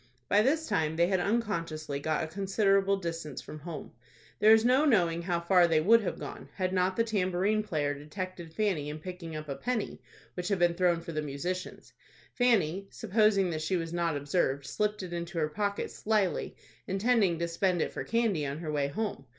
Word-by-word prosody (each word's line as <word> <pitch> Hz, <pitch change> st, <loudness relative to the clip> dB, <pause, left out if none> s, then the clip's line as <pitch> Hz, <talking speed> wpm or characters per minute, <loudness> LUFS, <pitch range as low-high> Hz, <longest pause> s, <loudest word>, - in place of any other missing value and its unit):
By 205 Hz, -, +4 dB
this 310 Hz, +7 st, +1 dB
time 160 Hz, -1 st, 0 dB
they 170 Hz, +1 st, +4 dB
had 190 Hz, -2 st, +2 dB
unconsciously 165 Hz, -9 st, -1 dB
got 155 Hz, +1 st, -1 dB
a -, -, -3 dB
considerable 195 Hz, +2 st, +2 dB
distance 165 Hz, -6 st, -5 dB
from 155 Hz, -, -9 dB
home. 155 Hz, -1 st, -7 dB, 0.5 s
There 215 Hz, -, +6 dB
is 220 Hz, +1 st, +6 dB
no 255 Hz, +4 st, +4 dB
knowing 175 Hz, -, +3 dB
how 170 Hz, 0 st, -1 dB
far 175 Hz, 0 st, +4 dB
they 160 Hz, -2 st, +3 dB
would 225 Hz, +8 st, +5 dB
have 195 Hz, -, -3 dB
gone, -, -, -8 dB
had 185 Hz, -1 st, -1 dB
not 185 Hz, 0 st, +1 dB
the 230 Hz, -, +3 dB
tambourine 200 Hz, -1 st, +1 dB
player 150 Hz, -8 st, -1 dB
detected 170 Hz, +3 st, -7 dB
Fanny 165 Hz, -6 st, -1 dB
in 150 Hz, -, -5 dB
picking 170 Hz, -1 st, -7 dB
up 155 Hz, 0 st, -6 dB
a 140 Hz, -, -2 dB
penny 245 Hz, -, -3 dB, 0.3 s
which 180 Hz, -1 st, -4 dB
had 200 Hz, -1 st, +1 dB
been 175 Hz, -1 st, +3 dB
thrown 175 Hz, -1 st, +2 dB
for 165 Hz, -, -7 dB
the 155 Hz, -1 st, -2 dB
musicians. 170 Hz, +6 st, -5 dB, 0.4 s
Fanny, 195 Hz, -7 st, +2 dB
supposing 210 Hz, -3 st, +2 dB
that 155 Hz, -1 st, -3 dB
she 180 Hz, +4 st, 0 dB
was 165 Hz, -1 st, -4 dB
not 170 Hz, -3 st, 0 dB
observed, 140 Hz, -2 st, 0 dB
slipped 210 Hz, +3 st, -1 dB
it 175 Hz, -1 st, -6 dB
into 170 Hz, 0 st, -5 dB
her 155 Hz, -2 st, +1 dB
pocket 200 Hz, +4 st, -2 dB
slily, 210 Hz, -6 st, 0 dB, 0.3 s
intending 195 Hz, -2 st, +2 dB
to 170 Hz, +1 st, -1 dB
spend 175 Hz, +1 st, 0 dB
it -, -, -1 dB
for -, -, -4 dB
candy 225 Hz, -9 st, +1 dB
on 140 Hz, 0 st, -3 dB
her 160 Hz, -1 st, -4 dB
way 145 Hz, -2 st, 0 dB
home. 200 Hz, -2 st, -4 dB
180 Hz, 200 wpm, -30 LUFS, 160-205 Hz, 0.5 s, There